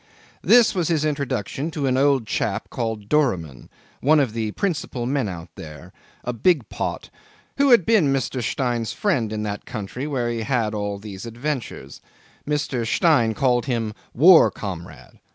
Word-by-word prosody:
'This 240 -3 +5
was 175 -5 0
his 155 -3 +1
introduction 140 -1 -2
to 150 -3 -3
an 130 -1 +1
old 135 -2 +3
chap - - -2
called 110 -3 -4
Doramin 90 - 0 0.3
one 155 +3 +4
of 130 -6 0
the 110 -2 -2
principal 150 -9 -2
men 130 -4 -1
out 85 -2 -8
there 75 -3 -11 0.3
a 125 - -3
big 140 - +2
pot - - -4 0.5
who 280 0 +4
had 235 -9 +6
been 195 -11 +3
Mr. 135 -1 -1
Stein's 120 -2 -1
friend 135 - 0
in 105 0 -3
that 105 -1 -5
country 125 +5 -5
where 125 -5 -1
he 115 -1 -3
had 110 -2 0
all 105 -1 -3
these 100 +1 -8
adventures. 120 - -5 0.5
Mr. 145 -5 -1
Stein 120 - +2
called 125 -1 +1
him 115 -4 -1 0.2
"war 165 +6 +7
comrade." 90 -5 -8
125 Hz, 160 wpm, -22 LUFS, 110-150 Hz, 0.5 s, war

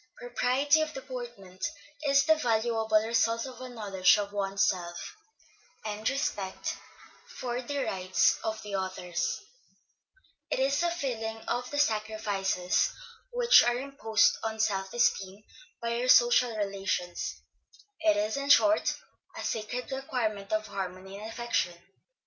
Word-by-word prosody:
Propriety 255 +5 +2
of 310 0 -3
deportment, 240 -8 -8 0.4
is 280 0 +5
the 315 - +6
valuable 230 -5 0 0.2
result 230 +1 +1
of 260 -1 -9
a 255 - -6
knowledge 205 -5 +3
of 200 -1 -3
one's 195 -1 +1
self, 175 - -3 0.7
and 210 0 -4
of 220 - +1
respect 205 -9 -2 0.5
for 245 0 -4
the 280 +2 -2
rights 185 -1 +2
of 220 -1 -3
others; 190 -3 -2 1.1
it - - 0
is 275 +3 +2
a 345 - +2
feeling 235 -9 -3
of 245 +1 -2
the 290 - -4
sacrifices 210 -7 +1 0.4
which 485 0 +6
are 240 0 +2
imposed 250 -5 +2
on 220 0 -3
self 195 -3 0
esteem 200 -4 0 0.4
by 235 0 -1
our 250 - -1
social 240 -2 +5
relations; 195 -3 -2 0.6
it 320 -1 +3
is, 215 +4 0
in 280 0 -3
short, 315 +2 +5 0.4
a - - -5
sacred 245 +4 -3
requirement 225 -7 -2
of 215 0 0
harmony 190 0 -6
and 215 +1 -7
affection. 225 -7 -1
225 Hz, 130 wpm, -29 LUFS, 200-255 Hz, 1.1 s, the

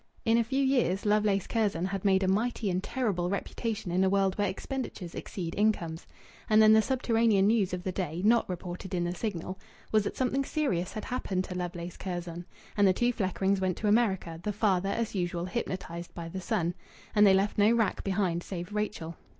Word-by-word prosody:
In 230 +1 +4
a - - +3
few 270 +4 0
years 245 -8 +1
Lovelace 205 -2 +2
Curzon 205 -7 0
had 195 0 -3
made 195 -1 +3
a - - +1
mighty 215 +1 0
and 180 +1 0
terrible 200 -8 -1
reputation 210 0 -3
in 180 +2 +2
the 190 - +4
world 195 -1 +2
where 205 -2 +1
expenditures 200 -4 -5
exceed 170 -4 -5
incomes. 175 -6 0 0.4
And 215 0 +6
then 215 0 +8
the 220 - +6
subterranean 225 -4 +2
news 210 -3 +3
of 180 -1 -4
the 185 - -2
day 175 -2 -3
not 230 -1 +4
reported 180 +1 -5
in 175 - 0
the 175 0 -1
Signal 185 -1 -4 0.3
was 215 -2 +3
that - - -4
something 265 +1 +1
serious 260 - -1
had 215 - -5
happened 195 -7 -2
to 185 - -6
Lovelace 175 -1 -5
Curzon. 175 -2 -5 0.3
And 205 -1 +4
the 185 - +5
two 240 +5 +1
Fleckrings 190 -1 0
went 185 -2 0
to 215 - -2
America, 195 -7 +1
the 210 - -2
father, 195 -2 +1
as 230 +2 -1
usual, 175 -2 -2
hypnotized 180 -4 -5
by 165 -1 -6
the 185 +2 -5
son. 175 -1 0 0.4
And 210 -1 +6
they 190 - +6
left 200 +2 +1
no 205 +2 +6
wrack 230 -3 +1
behind 185 -3 0
save 175 +2 -6
Rachel. 210 -6 -3
195 Hz, 200 wpm, -29 LUFS, 180-215 Hz, 0.4 s, then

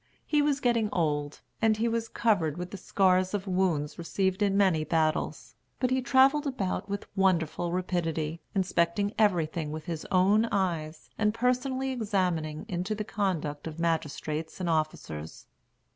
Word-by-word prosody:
He 300 -1 +2
was 290 -1 +1
getting 230 -3 +2
old, 150 -3 -1 0.2
and 220 -1 +3
he 230 +2 +1
was 230 0 -1
covered 175 -9 +1
with 180 +1 -5
the 200 - -6
scars 185 0 +2
of 200 -1 -3
wounds 180 -6 0
received 190 +3 -1
in 200 -1 +2
many 185 -6 +3
battles; 155 -1 -1 0.3
but 255 -1 +1
he 260 0 +2
travelled 270 +4 +4
about 200 -7 -2
with 200 0 -3
wonderful 175 -3 +1
rapidity, 170 -3 -2
inspecting 190 +2 +1
everything 170 -6 +1
with 155 0 -6
his 165 -3 -5
own 195 +4 +4
eyes, 165 -7 -2
and 210 0 +2
personally 255 +2 0
examining 180 -10 -1
into 185 +4 -2
the 210 - -3
conduct 165 -9 -2
of 160 0 -7
magistrates 160 -1 -2
and 180 - -2
officers. 120 - -3
185 Hz, 150 wpm, -28 LUFS, 160-215 Hz, 0.3 s, travelled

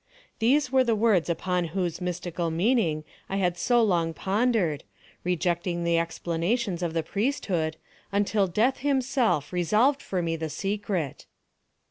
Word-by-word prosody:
These 255 +4 +3
were 260 -1 +5
the 235 -3 +1
words 210 -6 +2
upon 180 +1 0
whose 175 -2 -1
mystical 175 -1 -2
meaning 170 -3 +1 0.3
I 195 - -2
had 180 -3 +1
so 235 +7 +3
long 170 -6 +1
pondered, 200 - +1 0.4
rejecting 175 0 -1
the 170 0 +2
explanations 170 +4 -1
of 170 -2 -2
the 165 - +1
priesthood, 185 - -1 0.3
until 200 0 +2
Death 225 +9 +1
himself 260 - +1
resolved 215 - +2
for 185 -2 -2
me 165 -1 -1
the 160 -1 -4
secret. 195 -5 -3
180 Hz, 135 wpm, -26 LUFS, 170-225 Hz, 0.4 s, were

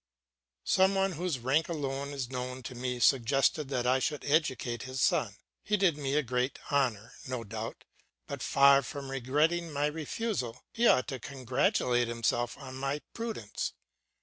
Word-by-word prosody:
Some 190 +1 +4
one 195 0 +2
whose 175 -3 -2
rank 135 +7 +1
alone 140 -3 -3
is 140 -3 -3
known 125 0 -4
to 125 - -6
me 125 0 -3
suggested 135 +4 +3
that 125 -3 -1
I 130 +1 +3
should 150 +3 -2
educate 130 -6 +1
his 130 +1 -5
son. - - +2 0.3
He 210 0 +1
did 185 -5 +3
me 140 -1 -2
a 150 - +3
great 125 +1 -1
honour, 120 -5 0
no 125 -2 -3
doubt, 110 +1 -6 0.4
but - - -6
far 140 0 +6
from 140 0 -6
regretting 150 +6 +1
my 145 0 0
refusal, 155 - -3
he 235 +1 +3
ought 130 - +4
to 130 - -4
congratulate 125 -2 +1
himself 120 +1 -1
on 130 -2 -8
my 140 +2 -2
prudence. 225 - -4
135 Hz, 160 wpm, -30 LUFS, 125-150 Hz, 0.4 s, far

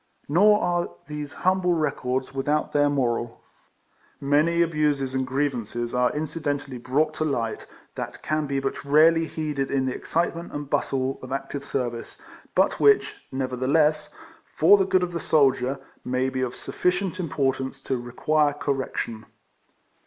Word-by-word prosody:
Nor 210 +7 +5
are 175 0 0 0.2
these 150 0 -6
humble 185 -1 +3
records 130 -5 -1
without 145 +3 0
their 145 0 +3
moral. 120 -4 -1 0.8
I>Iany 155 +5 +3
abuses 150 -5 0
and 130 -1 -1
grievances 120 -4 -2
are 125 0 +2
incident 150 -2 -2
ally 130 -2 -7
brought 145 +6 +1
to 155 - -2
light, 120 -7 -2 0.3
that - - -6
can 155 -1 -1
be 140 0 -1
but 135 0 -3
rarely 160 +3 +5
heeded 150 -4 -3
in 135 -1 0
the 130 - -1
excitement 170 0 -2
and 145 -1 -5
bustle 135 -1 -1
of 130 - -9
active 135 +1 -4
service, 120 -4 -4 0.4
but - - +2
which, 425 0 +4
nevertheless, 135 +4 +1 0.4
for - - +2
11 190 - +2
ADVERTISEMENT. - - -10
the - - -15
good 185 -1 +4
of 175 -1 -3
the 170 - -2
soldier, 135 -4 +2 0.2
may 130 +1 0
be 130 0 -3
of 125 -1 -2
sufficient 180 +1 -1
importance 135 -5 -1
to 135 - -2
require 145 +5 +1
correction. 135 -6 -3
140 Hz, 150 wpm, -25 LUFS, 130-155 Hz, 0.8 s, Nor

